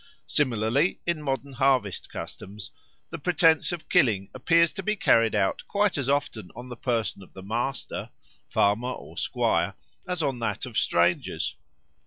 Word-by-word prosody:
Similarly 130 - +1
in 170 -3 -1
modern 135 -1 -3
harvest 130 -6 +1
customs 100 +1 -8 0.4
the 165 - -5
pretence 165 0 +3
of 175 -2 -6
killing 110 - +2
appears 165 +5 +3
to 195 - -4
be 210 +3 0
carried 115 - +3
out 95 - +1
quite 205 -1 +2
as 140 -4 -1
often 140 -9 -1
on 125 +2 -9
the 120 - -6
person 115 -5 -1
of 95 - -15
the 95 - -10
master 120 +6 -3 0.4
(farmer 105 +5 +2
or - - -11
squire) - - 0 0.3
as 180 -3 -2
on 135 -4 -1
that 115 +2 -2
of 125 -4 -9
strangers. 85 -2 +1
130 Hz, 155 wpm, -26 LUFS, 110-160 Hz, 0.4 s, pretence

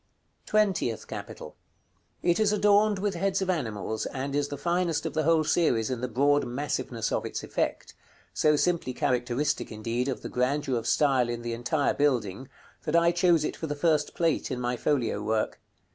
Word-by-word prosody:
§ - - -46
CXVIII. - - -44
TWENTIETH 195 - +1
CAPITAL. - - -8 0.7
It 175 +2 +2
is 215 -1 +3
adorned 210 0 +4
with 200 +1 -1
heads 195 +2 0
of 185 - +1
animals, 110 - -3
and 135 +1 -4
is 145 0 +1
the 145 - -6
finest 175 -1 0
of - - -3
the 155 - +1
whole 160 0 +3
series 140 -8 +1
in 125 -2 -3
the 125 - -1
broad 140 +4 +2
massiveness 125 -2 -3
of - - 0
its - - -5
effect; - - -2 0.4
so 150 0 +3
simply 160 -5 0
characteristic, 125 +3 0
indeed, 115 +4 -2
of 135 - -3
the - - -4
grandeur 135 +2 0
of 115 - -2
style 135 -5 +3
in 120 0 -4
the 120 0 -3
entire 130 +5 0
building, 130 -4 0 0.4
that 155 0 0
I 170 0 +5
chose 175 -2 +3
it - - -3
for 160 - -5
the 145 - -3
first 150 -1 +1
Plate 165 -2 0
in 130 -3 -3
my 125 0 -1
folio 120 -5 0
work. 110 +1 -1
145 Hz, 190 wpm, -27 LUFS, 120-170 Hz, 0.7 s, I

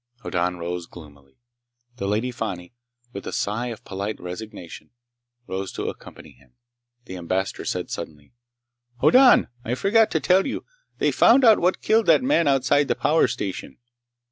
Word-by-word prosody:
Hoddan 90 -1 -1
rose, 85 0 -5
gloomily. 70 -5 -16 0.6
The 100 - -3
Lady 110 +5 -1
Fani, 95 -5 -6 0.4
with 100 - -7
a - - -4
sigh 110 +4 -2
of 115 -3 -8
polite 100 +2 -5
resignation, 90 0 -9 0.6
rose 95 -1 -5
to - - -3
accompany - - -12
him. 60 -1 -25 0.5
The 95 - -8
Ambassador 95 +2 -3
said - - -3
suddenly: 75 +5 -8 0.7
"Hoddan! 255 - +5
I 120 - -2
forgot 215 - +3
to - - 0
tell 190 +4 +2
you! 270 - -5 0.3
They - - +1
found 255 +2 +5
out 220 -2 +6
what 180 +2 0
killed 220 0 +2
that - - +5
man 255 - +2
outside 135 +1 +2
the - - 0
power 155 +2 +2
station!" 95 -3 -5
105 Hz, 155 wpm, -23 LUFS, -, 0.7 s, out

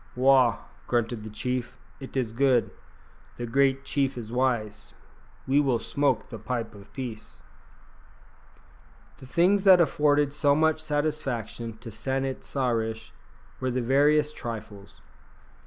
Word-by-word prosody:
"Wah!" 130 -3 +4 0.3
grunted 120 -1 -1
the 110 - -7
chief; 125 +3 -3 0.2
"it 135 0 -7
is 120 -4 -1
good. 125 0 +2 0.7
The 120 - -4
great 135 +2 +2
chief 135 -2 0
is 115 -2 -7
wise. 115 -4 -1 0.5
We 135 +2 +3
will 130 -4 +2
smoke 140 +5 0
the 115 - -8
pipe 115 +1 -4
of 100 -1 -14
peace." 115 -4 -8 1.7
The 130 - -13
things 185 +8 +3
that 190 -2 +8
afforded 150 -3 +2
so 145 -1 +3
much 155 0 +2
satisfaction 135 -7 -3
to 115 0 -9
San 135 +5 -2
it 135 -1 -5
sa 130 -3 -1
rish 110 -1 -3 0.5
were 130 - -1
the 125 0 -1
veriest 150 +4 +3
trifles. 105 -3 -8
130 Hz, 135 wpm, -26 LUFS, 115-140 Hz, 1.7 s, that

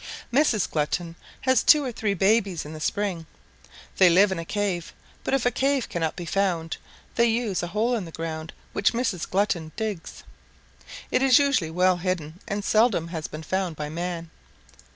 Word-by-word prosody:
"Mrs. 250 - +3
Glutton 165 +3 -2 0.3
has 260 -2 +3
two 300 -2 +6
or 255 - -2
three 215 -3 -1
babies 195 -3 +2
in 150 - -8
the 155 - -7
spring. 185 -2 -2 0.7
They 185 -2 +7
live 190 +3 +5
in 190 - -2
a 165 - -5
cave, 195 -4 -2 0.3
but 270 - +1
if 265 - -1
a 245 - +4
cave 275 -1 0
cannot 165 -2 -2
be 175 - -6
found, 170 -3 -1 0.4
they 235 - +3
use 225 -5 0
a 175 - -3
hole 215 +7 0
in 220 -6 -1
the 165 - -9
ground 160 0 -5 0.2
which 200 - +2
Mrs. 230 -8 -1
Glutton 185 -5 0
digs. 215 -6 -5 0.9
It - - +2
is 270 -1 +6
usually 280 - +2
well 180 +2 +3
hidden 175 -3 -3
and 205 0 -3
seldom 215 -7 +3
has 160 -3 -4
been 155 +1 -8
found 185 0 -2
by 150 0 -5
man. 170 0 -4
185 Hz, 180 wpm, -25 LUFS, 165-220 Hz, 0.9 s, They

